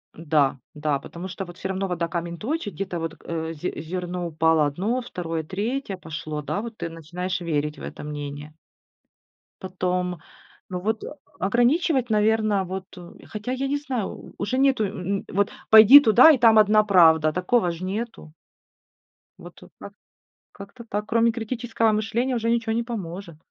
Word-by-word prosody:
Да-да. 150 -2 -1
Потому 170 +5 -8
что 190 +1 -6
вот, 175 0 -12
всё 190 - -5
равно 190 0 -2
вода 170 -2 -2
камень 170 0 -4
точит. 250 - -3
Где-то 185 -3 -4
вот, 165 0 -4
э, 165 -1 -4
зе 165 +3 -5
зерно 180 +1 -4
упало 160 -1 +2
1, 195 - -1
2, 165 -8 -4
3 205 - -3
пошло, 155 -2 -6
да, 195 +7 -3
вот 230 -1 -8
ты 170 - -4
начинаешь 175 +3 -5
верить 150 -2 -2
в - - -12
это - - -8
мнение. 145 0 -7 1.1
Потом 180 -1 -2 0.5
Ну 180 -1 -4
вот, 215 +4 -2
о 300 - -8 0.2
ограничивать, 245 - +2
наверно, 215 -1 +2
вот, 190 +1 -7 0.3
хотя 215 +3 -5
я 270 +1 -2
не 285 +1 0
знаю, 255 -8 -3
у - - -11
уже 230 +6 -1
нету, 265 -5 +3
э, 195 +1 -3
вот 200 +1 +1 0.2
"пойди 220 +6 +10
туда 250 +5 +7
и 290 - +3
там 225 -2 +6
1 215 0 +5
правда", 160 -6 +5
такого 180 0 +1
ж 170 +2 -8
нету. 205 -5 -5 1.1
Вот - - -13
и - - -14
как - - -10 0.6
Как-то 200 +4 -12
так. 210 -1 -4
Кроме 230 +1 +2
критического 230 -1 -1
мышления 230 +4 -1
уже 230 0 0
ниче 230 -1 0
не 235 - 0
поможет. 190 -7 -7
195 Hz, 165 wpm, -24 LUFS, 170-225 Hz, 1.1 s, пойди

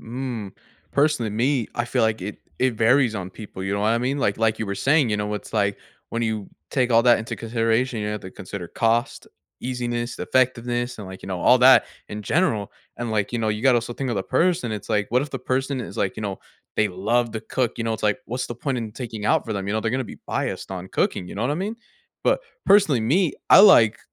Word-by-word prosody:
Mm, 120 -4 -5 0.4
personally, 140 -7 +2
me, 120 +2 0
I 120 - 0
feel 120 0 0
like 110 -3 +1
it 100 +2 -6 0.2
it 130 -2 +2
varies 115 +1 +3
on 95 -2 -5
people, 100 -1 -9
you 95 +1 -2
know 100 - -1
what 105 - +2
I 115 - +2
mean? 130 +4 -1
Like 100 -7 +1
like 110 -1 +1
you 110 - -3
were 100 - -2
saying, 135 -2 +2
you 105 - +1
know, 105 0 -2
it's 105 - -7
like, 100 -2 +1 0.3
when 115 - -2
you 110 -3 -2 0.2
take 125 -2 +1
all 115 0 +5
that 120 -1 +6
into 110 - -5
consideration, 115 +1 0
you 105 - -2
have 105 0 -3
to 95 - -8
consider 90 -1 -7
cost, 115 +6 0 0.3
easiness, 120 -1 -3
effectiveness, 120 -1 0
and 105 - -7
like, 95 0 -10
you - - -8
know, 90 -2 -3
all 125 - +6
that 130 +1 +7 0.2
in 105 0 -6
general, 115 - 0 0.2
and 120 -1 -4
like, 105 -1 -1
you 120 - -1
know, 110 - 0
you 105 0 -2
gotta 130 -2 +5
also 120 +1 -5
think 130 0 -3
of 110 - -1
the 95 - 0
person, 170 - +1
it's 105 -2 -6
like, 105 -2 +1
what 125 +2 +3
if 145 - -6
the 135 - -4
person 130 +2 -1
is - - -8
like, - - -1
you - - -5
know, - - -3 0.4
they 110 -1 +3
love 115 +6 0
to 110 - -4
cook, 120 +2 -2
you 115 - -2
know, 115 - 0
it's 110 - -5
like, 105 +3 +2
what's 125 +2 -3
the 120 - -4
point 130 +2 -2
in 115 -2 -4
taking 110 -3 -6
out - - +2
for 110 - -4
them, 100 -1 -3
you - - 0
know, 110 - 0
they're 110 - -1
gonna 130 +1 0
be - - -10
biased - - -3
on 95 0 -6
cooking, 90 - -1
you - - -8
know 105 - -2
what 125 - 0
I - - 0
mean? 200 +7 -3 0.5
But - - +3 0.3
personally 175 - +5
me, 150 - +2 0.2
I - - +10
like 115 - +7
115 Hz, 255 wpm, -23 LUFS, 105-130 Hz, 0.5 s, I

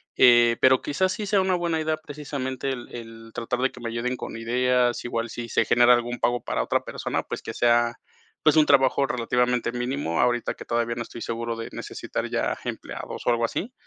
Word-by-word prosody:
Eh, 120 -1 +6
pero, 130 0 +5
quizás 185 +6 0
sí 210 +1 -3
sea 200 -1 +3
una 190 -1 +1
buena 170 -2 0
idea 155 0 0
precisamente 140 -3 -5
el 125 -3 -4
el 115 -1 -10
tratar 120 +1 -3
de 130 +1 +1
que - - -13
me 115 - -3
ayuden 115 +2 -2
con 115 - -7
ideas, 125 +1 +1
igual 115 -1 -2
si 115 +1 -6
se - - +2
genera 120 0 +6
algún 120 0 -3
pago 120 0 0
para - - -1
otra - - 0
persona, - - -3
pues, - - -6
que 110 - -6
sea, 120 0 +3 0.5
pues, 155 0 +5
un 155 - +6
trabajo 135 0 +4
relativamente 125 -2 0
mínimo. 120 - -1
Ahorita 120 -1 +1
que - - -10
todavía 120 0 0
no 115 - -4
estoy 115 0 -8
seguro 115 0 -3
de 115 - -6
necesitar - - -5
ya - - 0
empleados - - -6
o - - +2
algo 115 0 +2
así, 215 - -4
120 Hz, 210 wpm, -25 LUFS, 115-135 Hz, 0.5 s, Eh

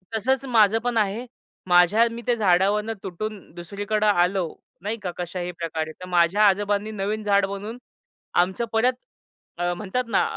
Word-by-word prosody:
तसंच 260 +5 0
माझं 225 -3 +4
पण 245 -1 -1
आहे. 215 +3 0 0.4
माझ्या 180 +6 +5
मी 230 +1 -7
त्या 245 -1 +2
झाडावरनं 205 +2 +2
तुटून 210 +3 -5 0.2
दुसरीकडे 205 +4 -2
आलो 185 -1 +2 0.4
नाही 210 +4 -3
का? 180 - -2
कशाही 180 0 -4
प्रकारे. 165 -2 -4
तर - - -6
माझ्या 180 +4 +4
आजोबांनी 205 +2 +1
नवीन 210 +1 -3
झाडं 200 -1 +2
बनवून 205 +4 -6 0.7
आमचं 190 +6 -3
परत 240 +3 +3 0.6
अ, 175 0 0
म्हणतात 210 +7 -2
ना, - - +2
205 Hz, 150 wpm, -24 LUFS, 180-220 Hz, 0.7 s, माझ्या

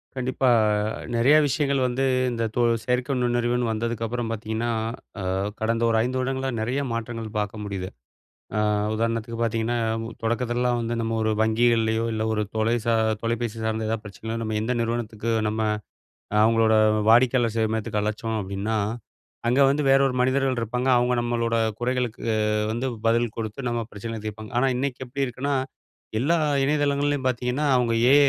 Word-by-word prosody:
கண்டிப்பா. 130 0 0 0.7
நெறைய 125 +6 +5
விஷயங்கள் 140 -1 +1
வந்து 125 +2 0 0.3
இந்த 115 -1 -2
தொ 125 - +2 0.2
செயற்கை 125 +3 0
நுண்ணறிவுன்னு 120 0 +1
வந்ததுக்கப்பறம் 115 +1 -2
பார்த்தீங்கன்னா, 110 +1 -2 0.5
அ - - -4 0.4
கடந்த 115 +1 0
ஒரு 115 - +2
5 130 +2 -1
வருடங்களா 130 +1 -1
நெறைய 125 +6 -1
மாற்றங்கள் 115 -1 -4
பார்க்க 105 +1 -3
முடியுது. 95 -2 -4 0.7
அ - - +2 0.3
உதாரணத்துக்கு 115 +1 -2
பார்த்தீங்கன்னா, 115 +1 0 0.4
தொடக்கதுலெல்லாம் 120 +1 0
வந்து 115 0 -2
நம்ம 115 0 -1
ஒரு 110 0 +1
வங்கிகள்லயோ, 110 0 +2
இல்ல 110 0 -1
ஒரு 105 -1 0
தொலை 110 +2 +2
சா 115 - +3 0.3
தொலைபேசி 115 -1 -2
சார்ந்த 110 0 -1
எதாவது 110 -1 -2
பிரச்சனையினா, 110 +3 -6
நம்ம 110 -1 -2
எந்த 120 +3 -1
நிறுவனத்துக்கு 115 -1 -2 0.2
நம்ம 110 +1 -2 0.8
அவுங்களோட 115 0 +4 0.3
வாடிக்கையாளர் 120 -1 +4
சேவை 110 -1 +2
மையத்துக்கு 105 -1 -1
அழச்சோம் 110 +1 -2
அப்பிடின்னா, 100 +3 -2 0.7
அங்க 125 +3 +3
வந்து 145 +2 +1
வேற 135 0 +6
ஒரு 130 - -2
மனிதர்கள் 130 0 +1
இருப்பாங்க. 125 +3 -2
அவுங்க 125 +1 +2
நம்மளோட 120 -1 0 0.3
குறைகளுக்கு 125 -2 -1
அ - - +1 0.3
வந்து 120 +3 -2 0.2
பதில் 115 0 +2
கொடுத்து, 115 +3 -4
நம்ம 120 0 -1
பிரச்சனைகள 110 +1 -6
தீர்ப்பாங்க. 110 0 -7
ஆனா, 135 +1 +3
இன்னைக்கி 130 -1 -2
எப்படி 135 +2 -1
இருக்குன்னா, 135 +3 -2 0.7
எல்லா 165 +6 +2 0.3
இணையதளங்கள்லேயும் 145 -1 +1
பார்த்தீங்கன்னா, 125 +4 -1
அவங்க 120 -2 +1 0.2
ஏ. - - +7
115 Hz, 150 wpm, -24 LUFS, 110-125 Hz, 0.8 s, ஏ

